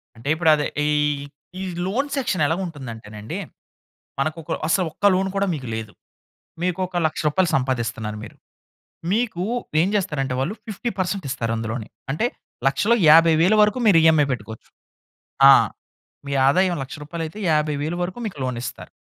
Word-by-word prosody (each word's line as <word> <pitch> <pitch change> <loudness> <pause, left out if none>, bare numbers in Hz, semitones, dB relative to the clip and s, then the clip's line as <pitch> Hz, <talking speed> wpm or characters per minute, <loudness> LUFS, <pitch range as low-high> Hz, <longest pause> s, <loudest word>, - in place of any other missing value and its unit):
అంటే 115 +5 -6
ఇప్పుడు 160 0 +2
అదే 150 -1 -1 0.2
ఈ - - +2 0.7
ఈ - - -4 0.2
లోన్ 245 +10 -1
సెక్షన్ 240 - -1
ఎలా 160 +3 +1
ఉంటుందంటేనండి, 115 -9 -7 0.8
మనకు 155 +4 -1
ఒక 160 - -8 0.2
అస్సల 185 +3 +2
ఒక్క 200 - -4
లోన్ 190 +1 0
కూడా 200 0 +1
మీకు 135 -5 -6
లేదు. 110 -2 -6 0.7
మీకొక 180 0 -1
1,00,000 155 - -3
రూపాయలు 175 +3 +1
సంపాదిస్తున్నారు 115 -5 -2
మీరు. 105 - -12 0.8
మీకు 215 -4 0 0.4
ఏం 180 - +2
చేస్తారంటే 150 -10 -1
వాళ్ళు 135 +10 -1
50% 195 -4 -3
ఇస్తారు 115 -3 -2
అందులోనే. 115 0 -4 0.2
అంటే 155 +12 0 0.4
1,00,000 205 +12 +3
50,000 165 +4 +6
వరకు 210 +2 +3
మీరు 190 - +6
ఈఎమ్ఐ 160 -2 +5
పెట్టుకోచ్చు. 110 -2 -7 0.8
ఆ! - - +10 0.7
మీ 140 - -4 0.2
ఆదాయం 180 +5 +3
1,00,000 135 - -7
రూపాయలు 165 +3 -5
అయితే 160 +7 -10
50,000 150 +1 0
వరుకు 180 +5 -4
మీకు 195 -8 -7
లోన్ 125 -1 -2
ఇస్తారు. - - -7
155 Hz, 150 wpm, -22 LUFS, 130-185 Hz, 0.8 s, ఆ